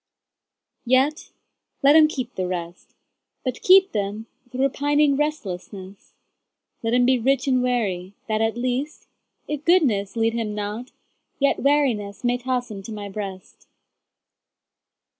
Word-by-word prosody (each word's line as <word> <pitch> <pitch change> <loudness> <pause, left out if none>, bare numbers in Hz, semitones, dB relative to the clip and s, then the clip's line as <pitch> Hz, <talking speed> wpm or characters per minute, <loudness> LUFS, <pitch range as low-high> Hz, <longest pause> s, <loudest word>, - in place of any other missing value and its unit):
Yet 270 +7 +2 0.5
let 285 +2 +6
him 315 -1 +8
keep 255 -5 -5
the 185 -1 -2
rest, 175 -1 -6 0.5
But 255 -2 -3
keep 380 +1 +6
them 205 +1 -3 0.2
with 250 0 -9
repining 285 +2 +2
restlessness; 200 -9 -5 0.7
Let 230 +1 0
him 245 0 +4
be 255 0 +3
rich 265 +3 +1
and 255 -2 +3
weary, 200 -7 -1
that 215 0 0
at 225 +1 0
least, 255 +4 -3 0.4
If 300 -1 -4
goodness 260 - +2
lead 225 0 +1
him 225 -3 -3
not, 210 +4 -5 0.5
yet 280 0 +2
wearinessMay 245 -4 0
toss 250 -1 -2
him 200 -2 -7
to 205 - -9
My 205 -2 -6
breast. 195 -2 -8
245 Hz, 130 wpm, -23 LUFS, 205-275 Hz, 0.7 s, him